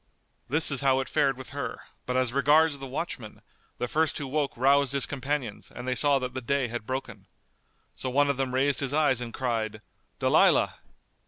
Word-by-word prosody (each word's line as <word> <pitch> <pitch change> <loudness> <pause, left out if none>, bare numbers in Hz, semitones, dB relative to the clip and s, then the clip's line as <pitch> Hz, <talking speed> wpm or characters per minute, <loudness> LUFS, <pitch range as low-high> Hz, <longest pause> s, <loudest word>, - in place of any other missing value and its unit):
This 150 +3 +4
is 140 - +1
how 135 -1 +3
it 135 - -3
fared 135 -2 +1
with 130 - -8
her; - - -5 0.3
but 125 0 0
as 130 -2 +1
regards 145 +2 +3
the 135 - -7
watchmen, 130 - -5 0.4
the 125 - -2
first 160 +3 0
who 145 - -4
woke 140 0 -2
roused 140 +1 +3
his 140 -2 +3
companions 135 -5 -4
and 125 - -7
they 130 - +1
saw 140 +2 +3
that 130 -1 -4
the 130 - -4
day 130 0 0
had 115 -2 -6
broken. 125 -6 -5 0.7
So 130 - -5
one 145 +3 +3
of 140 -2 0
them 130 -1 -2
raised 140 +1 +2
his 135 0 0
eyes 145 -5 +2
and 120 -1 -5
cried, 115 -4 -2 0.4
"Dalilah." - - +3
135 Hz, 195 wpm, -27 LUFS, 125-140 Hz, 0.7 s, This